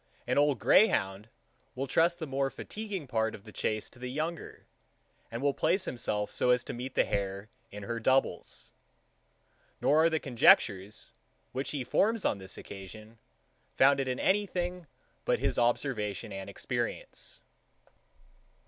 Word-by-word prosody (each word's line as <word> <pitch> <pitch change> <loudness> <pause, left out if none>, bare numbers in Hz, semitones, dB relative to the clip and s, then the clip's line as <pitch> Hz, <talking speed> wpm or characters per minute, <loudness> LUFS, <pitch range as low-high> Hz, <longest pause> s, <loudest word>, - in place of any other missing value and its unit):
An - - 0
old 145 -1 +3
greyhound 105 - +3 0.5
will 135 +2 -2
trust 165 +6 +3
the 165 - -4
more 135 -1 0
fatiguing 205 0 -6
part 110 -3 0
of 100 - -13
the 105 - -12
chace 110 0 -2
to 120 - -18
the 125 0 -5
younger, 155 +5 -4 0.6
and 115 +3 -5
will 140 -1 +3
place 175 +7 +2
himself 105 -4 -2
so - - +1
as 125 0 +4
to - - -6
meet 125 +2 -6
the - - +4
hare 100 +1 -3 0.2
in 105 0 -8
her 115 +3 -3
doubles; 130 -6 0 1.1
nor 155 +2 +4
are 165 - +5
the 160 -1 0
conjectures, 105 -6 +3 0.4
which 135 +2 -3
he 140 -3 -2
forms 215 - +1
on 100 - +1
this 95 0 -7
occasion, 110 +3 -10 0.6
founded 135 0 +4
in 130 0 -2
any 205 +1 +2
thing 180 -2 -3 0.4
but - - +2
his - - 0
observation 115 -5 0
and 95 0 -6
experience. - - -4
125 Hz, 150 wpm, -30 LUFS, 105-155 Hz, 1.1 s, are